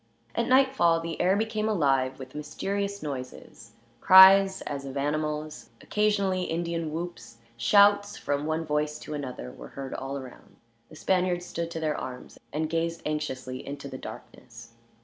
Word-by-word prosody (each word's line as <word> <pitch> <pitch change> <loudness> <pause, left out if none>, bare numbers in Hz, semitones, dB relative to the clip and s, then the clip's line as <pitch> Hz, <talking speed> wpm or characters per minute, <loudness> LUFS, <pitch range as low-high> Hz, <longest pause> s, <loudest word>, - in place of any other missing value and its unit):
At - - -1
nightfall 260 -11 +4
the 165 0 -4
air 185 +2 +3
became 220 0 -1
alive 135 -9 +1
with 130 -1 -10
mysterious 200 +6 -4
noises; 130 -6 -8 0.3
cries 190 +2 +8
as 140 -1 -5
of 135 0 -6
animals, 150 +1 -3
occasionally 200 -3 0
Indian 165 -1 -2
whoops, 155 -9 -6 0.2
shouts 205 - +4
from 145 +1 -2
one 160 +1 -1
voice 150 0 -1
to 155 - -8
another 130 - -6
were - - -11
heard 135 - -7
all 135 +1 -4
around. 130 -2 -12 0.3
The - - -13
Spaniards 180 +1 0
stood 170 -1 -4
to 165 -1 -5
their 155 -2 -1
arms, 125 -1 -8
and 155 +2 -1
gazed 165 +1 -2
anxiously 130 -4 -4
into 140 0 -7
the 130 -1 -8
darkness. 115 +1 -11
155 Hz, 150 wpm, -27 LUFS, 135-185 Hz, 0.3 s, cries